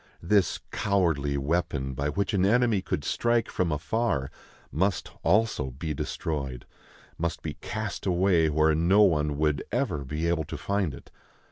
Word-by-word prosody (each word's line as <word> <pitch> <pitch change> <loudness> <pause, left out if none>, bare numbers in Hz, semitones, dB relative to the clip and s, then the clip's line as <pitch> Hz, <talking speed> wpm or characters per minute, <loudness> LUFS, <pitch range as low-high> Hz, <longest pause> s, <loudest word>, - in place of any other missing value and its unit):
This 100 +2 +2
cowardly 80 -9 +1
weapon, 70 -2 -1
by 70 +3 -1
which 100 +8 -1
an 95 -2 +2
enemy 115 0 +3
could 75 - -3
strike 120 +6 +1
from 90 -3 0
afar, 75 - -1 0.4
must 95 +5 0
also 105 -5 +2
be 75 +5 -4
destroyed, 70 -4 -4 0.5
must 85 0 -2
be - - -3
cast - - -4
away 90 -3 +3
where 80 +1 +3
no 90 +7 +4
one 75 -6 +2
would 75 -2 +1
ever 70 - -1
be 75 +5 -2
able 85 -2 0
to - - -6
find 100 -8 -1
it. - - -15
80 Hz, 150 wpm, -27 LUFS, 75-100 Hz, 0.5 s, no